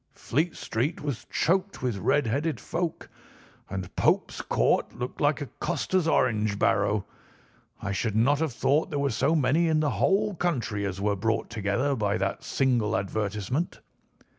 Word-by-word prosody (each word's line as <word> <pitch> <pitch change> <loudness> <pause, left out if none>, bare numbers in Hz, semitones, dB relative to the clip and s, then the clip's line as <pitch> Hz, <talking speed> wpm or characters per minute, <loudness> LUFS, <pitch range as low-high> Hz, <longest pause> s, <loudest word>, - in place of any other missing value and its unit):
Fleet 160 +6 -1
Street 130 +9 -2
was 140 -6 -4
choked 190 -2 0
with 120 -6 -1
red 145 +9 +2
headed 145 +8 -1
folk, 170 0 -3 0.6
and 95 -1 -5
Pope's - - +1
Court - - +1
looked 125 +1 -5
like 145 +1 +2
a - - -2
coster's 185 -3 0
orange 110 -8 +2
barrow. 100 0 +2 0.7
I 100 - -3
should 105 +2 -1
not 135 +6 +3
have 160 -3 0
thought 145 +6 +1
there 145 - -2
were 140 -1 +1
so 140 +8 +2
many 155 +4 +3
in 160 -1 +3
the 150 -2 +1
whole 205 +2 +2
country 120 - -1
as 95 0 -5
were 100 0 +1
brought 110 +4 -1
together 115 +6 0
by 105 -3 0
that 95 0 -2
single 120 -5 +1
advertisement. 105 - -2
125 Hz, 160 wpm, -27 LUFS, 105-155 Hz, 0.7 s, not